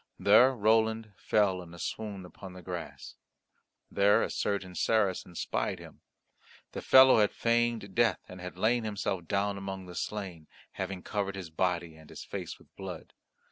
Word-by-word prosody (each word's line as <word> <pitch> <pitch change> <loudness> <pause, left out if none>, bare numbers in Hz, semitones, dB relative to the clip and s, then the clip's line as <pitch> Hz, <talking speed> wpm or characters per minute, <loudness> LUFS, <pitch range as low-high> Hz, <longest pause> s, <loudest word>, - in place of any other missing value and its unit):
There 125 +6 +6
Roland 110 0 +2
fell 95 -3 +1
in 85 -1 -12
a - - -11
swoon 100 0 -5
upon 95 +1 -11
the 90 -1 -11
grass. 80 -6 -7 0.7
There 100 +1 +4
a - - -3
certain 100 -3 -2
Saracen 95 -3 0
spied - - -2
him. - - -13 0.7
The - - -6
fellow 130 -3 +7
had 105 -1 +3
feigned 115 -3 0
death, 115 +1 +2
and 90 0 -10
had 90 0 -8
laid 115 +4 +2
himself 100 -5 -3
down 100 0 0
among 95 -1 -6
the 90 - -10
slain, 90 -5 -5 0.2
having 95 -2 -5
covered 100 -2 -2
his 90 -4 -7
body 85 -1 -1
and 80 -1 -16
his - - -9
face - - -6
with - - -24
blood. 95 -4 -8
100 Hz, 165 wpm, -30 LUFS, 90-110 Hz, 0.7 s, fellow